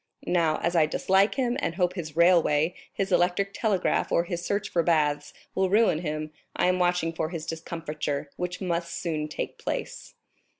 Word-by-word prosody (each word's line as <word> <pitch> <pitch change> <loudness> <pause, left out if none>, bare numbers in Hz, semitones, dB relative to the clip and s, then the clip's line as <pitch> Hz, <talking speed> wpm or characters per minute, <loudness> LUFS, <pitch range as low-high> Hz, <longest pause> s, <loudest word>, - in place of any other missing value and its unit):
Now, 165 -3 +2
as 170 +1 0
I 160 -2 +5
dislike 190 +5 +2
him, 250 -3 0
and 170 - -2
hope 180 -1 +1
his 155 -5 -6
railway, 170 -2 +4 0.2
his 195 0 -2
electric 185 +3 +2
telegraph, 205 -6 0
or 170 - +3
his 175 -1 -4
search 200 +3 -1
for 170 - +1
baths, 150 -3 +1 0.2
will 190 0 +1
ruin 210 -5 +4
him, 155 -2 -4 0.2
I - - +2
am 185 0 +1
watching 175 -2 +1
for 160 -1 -2
his 165 -3 -5
discomfiture, 155 -3 -4
which 180 +1 -4
must 170 -2 -2
soon 155 -3 -2
take 155 - -5
place." - - -5
170 Hz, 175 wpm, -27 LUFS, 155-185 Hz, 0.2 s, I